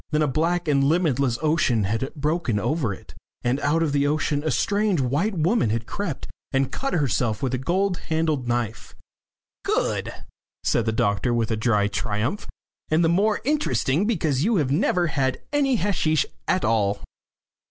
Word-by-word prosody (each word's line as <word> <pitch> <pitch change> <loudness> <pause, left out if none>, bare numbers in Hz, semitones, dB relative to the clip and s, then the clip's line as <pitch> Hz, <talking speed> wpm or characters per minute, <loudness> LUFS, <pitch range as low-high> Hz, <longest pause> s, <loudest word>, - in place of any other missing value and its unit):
Then 155 0 +1
a - - +2
black 170 +5 0
and 140 -2 +3
limitless 140 -5 +2
ocean 150 -8 +2
had 110 +7 -2
broken 150 -5 0
over 120 +1 0
it, 95 - -10 0.3
and 125 +3 +1
out 160 +3 +1
of 155 - 0
the 140 0 +2
ocean 150 -1 0
a 155 - 0
strange 205 0 +1
white 145 - 0
woman 175 - +2
had 115 +1 -1
crept 180 - -4 0.2
and 135 -1 +1
cut 275 - -3
herself 125 -7 0
with 130 -1 -1
a 130 - 0
gold 180 +6 0
handled 160 -5 0
knife. 120 -2 -3 0.7
"Good," - - 0 0.5
said 115 - +1
the - - +3
doctor, 110 +2 +1
with 115 -1 0
dry 105 -3 +2
triumph. 105 - -2 0.4
"And 155 +2 +3
the - - +3
more 205 +5 +2
interesting 210 - +1
because 155 - 0
you 225 +4 +2
have 145 -7 +1
never 175 +4 +2
had 135 -5 0
any 275 -3 +2
hasheesh 165 -6 +1 0.2
at 185 - +1
all." 105 -3 +1
145 Hz, 165 wpm, -24 LUFS, 120-170 Hz, 0.7 s, and